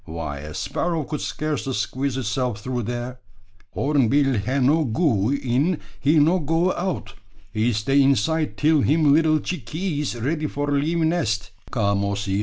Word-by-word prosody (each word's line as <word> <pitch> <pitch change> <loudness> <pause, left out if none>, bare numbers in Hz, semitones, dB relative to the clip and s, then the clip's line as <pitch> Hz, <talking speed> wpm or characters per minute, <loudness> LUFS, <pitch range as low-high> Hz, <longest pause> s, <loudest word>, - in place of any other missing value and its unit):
Why, 80 -4 -5
a 75 +2 -8
sparrow 165 -3 -1
could 150 +1 -4
scarcely 150 -3 -2
squeeze 130 +5 -2
itself 120 -2 -2
through 125 -1 -2
there!" 120 +2 -4 0.6
"Horneebill 135 -2 +2
he 130 +2 0
no 145 +5 +3
goee 130 - +1
in, 140 +7 0 0.2
he 150 +3 +3
no 165 +5 +4
goee 165 +4 +1
out. 185 0 -3 0.4
He 110 +2 +1
stay 135 +7 +2
inside 140 +4 +1
till 155 0 +3
him 150 +1 +4
little 155 0 +4
chickees 150 - -3
ready 150 +6 -1
for 145 0 -3
leavee 160 +4 +1
nest." 110 - 0 0.2
"Come, 100 -4 0
Ossy!" 100 0 -1
140 Hz, 150 wpm, -23 LUFS, 115-155 Hz, 0.6 s, no